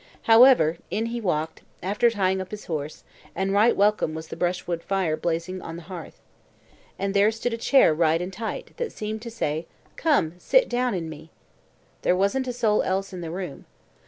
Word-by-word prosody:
However, 225 Hz, -, +6 dB
in 215 Hz, +5 st, -1 dB
he 240 Hz, -, -3 dB
walked, 160 Hz, -5 st, -2 dB, 0.2 s
after 205 Hz, +6 st, +2 dB
tying 190 Hz, -4 st, 0 dB
up 185 Hz, -, -7 dB
his 210 Hz, 0 st, -8 dB
horse, 155 Hz, -2 st, -5 dB, 0.3 s
and 195 Hz, +2 st, -1 dB
right 215 Hz, +4 st, +4 dB
welcome 205 Hz, -6 st, +2 dB
was 160 Hz, 0 st, -7 dB
the -, -, -6 dB
brushwood 175 Hz, -1 st, -2 dB
fire 190 Hz, -5 st, 0 dB
blazing 170 Hz, +3 st, -3 dB
on 165 Hz, -, -7 dB
the 170 Hz, -, -9 dB
hearth. 175 Hz, -2 st, -9 dB, 0.8 s
And 195 Hz, 0 st, -2 dB
there 200 Hz, +1 st, +5 dB
stood 225 Hz, +2 st, -3 dB
a -, -, 0 dB
chair 250 Hz, -, +4 dB
right 160 Hz, 0 st, +2 dB
and 180 Hz, +2 st, -5 dB
tight, 230 Hz, -, -5 dB
that 480 Hz, -2 st, -3 dB
seemed 215 Hz, 0 st, -5 dB
to 235 Hz, -, -7 dB
say, 160 Hz, -8 st, -3 dB, 0.3 s
"Come, 280 Hz, -, +2 dB
sit -, -, +3 dB
down 245 Hz, -2 st, 0 dB
in 165 Hz, -3 st, -3 dB
me." 160 Hz, 0 st, -10 dB, 0.7 s
There 180 Hz, -, +2 dB
wasn't 200 Hz, +8 st, +1 dB
a -, -, -1 dB
soul 225 Hz, -3 st, +2 dB
else 195 Hz, +1 st, -2 dB
in 180 Hz, -, -6 dB
the 165 Hz, -, -5 dB
room. 175 Hz, -3 st, -6 dB
190 Hz, 190 wpm, -25 LUFS, 165-225 Hz, 0.8 s, However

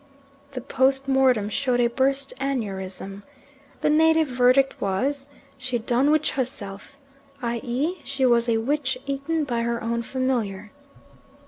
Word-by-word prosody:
The 255 Hz, -, -4 dB
post 270 Hz, +1 st, +1 dB
mortem 260 Hz, -6 st, +3 dB
showed 250 Hz, +3 st, 0 dB
a 240 Hz, -, +4 dB
burst 270 Hz, +3 st, +1 dB
aneurism. 195 Hz, -7 st, -4 dB, 0.6 s
The -, -, +2 dB
native 320 Hz, 0 st, +4 dB
verdict 255 Hz, +2 st, +3 dB
was 265 Hz, +9 st, -1 dB, 0.3 s
"She 255 Hz, -2 st, -1 dB
done 245 Hz, +4 st, +1 dB
witch 305 Hz, 0 st, +2 dB
herself," 235 Hz, -2 st, -5 dB, 0.5 s
i.e. 245 Hz, +9 st, -2 dB
she 275 Hz, -1 st, -1 dB
was 235 Hz, -1 st, +3 dB
a 225 Hz, -, +3 dB
witch 265 Hz, +3 st, 0 dB
eaten 280 Hz, +4 st, -1 dB
by 240 Hz, -5 st, -1 dB
her 235 Hz, 0 st, -1 dB
own 235 Hz, +1 st, -1 dB
familiar. 230 Hz, -5 st, -2 dB
255 Hz, 130 wpm, -24 LUFS, 235-275 Hz, 0.6 s, a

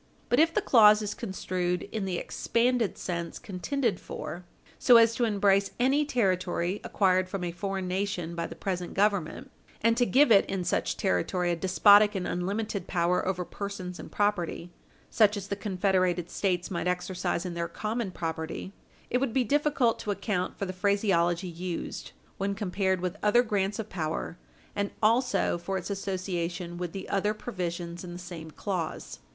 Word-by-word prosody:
But 245 Hz, -, +3 dB
if 325 Hz, +1 st, +5 dB
the -, -, 0 dB
clause 215 Hz, -3 st, +6 dB
is 210 Hz, -, -2 dB
construed 185 Hz, -4 st, -2 dB
in 215 Hz, -3 st, -2 dB
the 185 Hz, -2 st, -2 dB
expanded 235 Hz, +1 st, 0 dB
sense 170 Hz, -2 st, -4 dB
contended 210 Hz, +3 st, -2 dB
for, 175 Hz, +3 st, -7 dB, 0.3 s
so 245 Hz, -2 st, +7 dB
as 230 Hz, 0 st, +6 dB
to 240 Hz, +1 st, +1 dB
embrace 200 Hz, -2 st, +3 dB
any 275 Hz, +4 st, +3 dB
territory 185 Hz, -7 st, 0 dB
acquired 185 Hz, -2 st, +2 dB
from 195 Hz, -1 st, -4 dB
a 175 Hz, -, -2 dB
foreign 190 Hz, +1 st, -3 dB
nation 180 Hz, -2 st, -2 dB
by 170 Hz, 0 st, -3 dB
the -, -, -9 dB
present 180 Hz, -2 st, -4 dB
Government 200 Hz, -5 st, 0 dB, 0.3 s
and 230 Hz, +1 st, +3 dB
to 245 Hz, -1 st, +3 dB
give 270 Hz, -1 st, +5 dB
it 200 Hz, -, +6 dB
in 190 Hz, -2 st, -2 dB
such -, -, -1 dB
territory 175 Hz, -, 0 dB
a -, -, +1 dB
despotic 205 Hz, +4 st, +5 dB
and 185 Hz, -2 st, -2 dB
unlimited 200 Hz, +3 st, -2 dB
power 180 Hz, 0 st, +1 dB
over 180 Hz, -1 st, -1 dB
persons 185 Hz, -3 st, -6 dB
and -, -, -9 dB
property 180 Hz, -4 st, -1 dB, 0.4 s
such 210 Hz, -2 st, +4 dB
as 200 Hz, 0 st, -6 dB
the 200 Hz, -, -1 dB
confederated 185 Hz, -3 st, 0 dB
States 180 Hz, -2 st, -1 dB
might 175 Hz, 0 st, -2 dB
exercise 180 Hz, 0 st, -1 dB
in 180 Hz, -, -4 dB
their 170 Hz, 0 st, -2 dB
common 220 Hz, +2 st, -3 dB
property, 165 Hz, +2 st, -5 dB, 0.4 s
it 250 Hz, -, +2 dB
would 260 Hz, -4 st, -1 dB
be 260 Hz, -, +3 dB
difficult 280 Hz, -2 st, +2 dB
to 210 Hz, -, -6 dB
account 200 Hz, -2 st, -2 dB
for 200 Hz, -, -2 dB
the 185 Hz, -, -5 dB
phraseology 185 Hz, -3 st, +1 dB
used 175 Hz, 0 st, -5 dB, 0.3 s
when 200 Hz, +1 st, -1 dB
compared 190 Hz, -2 st, 0 dB
with 180 Hz, +2 st, -3 dB
other 240 Hz, +4 st, +4 dB
grants 205 Hz, -3 st, -1 dB
of 220 Hz, -, -4 dB
power 160 Hz, -, -4 dB, 0.4 s
and 200 Hz, -1 st, -1 dB
also 230 Hz, -5 st, +2 dB
for 190 Hz, +3 st, -3 dB
its 190 Hz, +2 st, -5 dB
association 180 Hz, -3 st, -3 dB
with 175 Hz, -2 st, -3 dB
the 190 Hz, +1 st, -6 dB
other 205 Hz, +2 st, 0 dB
provisions 175 Hz, -5 st, -5 dB
in 175 Hz, -1 st, -7 dB
the -, -, -7 dB
same 175 Hz, -3 st, -8 dB
clause. 175 Hz, 0 st, -4 dB
190 Hz, 170 wpm, -28 LUFS, 175-210 Hz, 0.4 s, so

